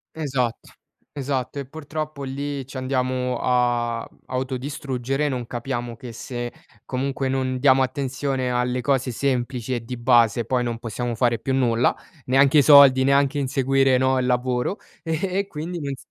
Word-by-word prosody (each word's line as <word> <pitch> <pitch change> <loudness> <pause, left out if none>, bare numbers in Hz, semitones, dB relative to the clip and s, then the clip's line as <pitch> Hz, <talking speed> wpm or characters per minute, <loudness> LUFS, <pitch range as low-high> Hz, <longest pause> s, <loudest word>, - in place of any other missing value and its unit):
Esatto, 130 -7 -2 0.4
esatto. 135 -1 -3
E, 140 - -4
purtroppo 155 -1 -6
lì 140 0 -4
ci 135 - -9
andiamo 130 -1 -1
a, 120 -2 +1
mhmm, - - -26
autodistruggere, 130 +1 -2
non 125 -3 -3
capiamo 120 -1 -4
che 120 +1 -9
se, 120 +1 -5 0.3
comunque, 135 +1 -2
non 130 -1 -1
diamo 135 -1 +5
attenzione 130 0 -2
alle 125 0 0
cose 135 0 0
semplici 125 -1 -1
e 120 - -3
di 125 +2 -6
base, 120 -2 +3
poi 125 0 0
non 120 -1 -3
possiamo 120 +1 -3
fare 120 0 +2
più 135 - -2
nulla, 120 -2 +2 0.3
neanche 135 +3 +5
i - - +7
soldi, 140 -2 +8
neanche 140 +1 +3
inseguire, 135 -1 +2
no, 130 +1 +2
il 130 - 0
lavoro, 125 +7 0 0.3
e 185 +4 -1
quindi 170 +1 -5
non 140 -1 -3
s - - -20
130 Hz, 155 wpm, -23 LUFS, 125-140 Hz, 0.4 s, soldi